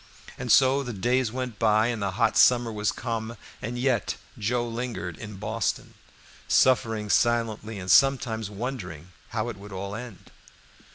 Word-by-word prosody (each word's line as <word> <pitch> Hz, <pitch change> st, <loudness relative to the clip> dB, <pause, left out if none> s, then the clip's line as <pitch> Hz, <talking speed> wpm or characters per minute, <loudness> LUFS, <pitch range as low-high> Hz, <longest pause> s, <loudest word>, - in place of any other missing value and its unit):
And 125 Hz, -2 st, -3 dB
so 135 Hz, +3 st, +5 dB
the 125 Hz, -3 st, -5 dB
days 120 Hz, +4 st, +1 dB
went 125 Hz, -3 st, -5 dB
by 110 Hz, 0 st, +3 dB
and 115 Hz, -3 st, -3 dB
the 100 Hz, -1 st, -1 dB
hot 115 Hz, -1 st, +2 dB
summer 120 Hz, -2 st, +5 dB
was 105 Hz, -1 st, 0 dB
come, 115 Hz, -1 st, -4 dB, 0.2 s
and 120 Hz, +3 st, -4 dB
yet 125 Hz, -3 st, 0 dB, 0.2 s
Joe 120 Hz, +3 st, 0 dB
lingered 115 Hz, -7 st, -4 dB
in 105 Hz, +3 st, -9 dB
Boston, 110 Hz, +2 st, -2 dB, 0.5 s
suffering 115 Hz, -4 st, +3 dB
silently 110 Hz, -1 st, +1 dB
and 90 Hz, -1 st, -2 dB
sometimes 120 Hz, -6 st, +3 dB
wondering 100 Hz, -, -6 dB, 0.2 s
how 110 Hz, 0 st, -2 dB
it 115 Hz, -, -7 dB
would 100 Hz, +1 st, -11 dB
all 100 Hz, +1 st, -5 dB
end. 115 Hz, -4 st, -9 dB
115 Hz, 155 wpm, -26 LUFS, 105-125 Hz, 0.5 s, so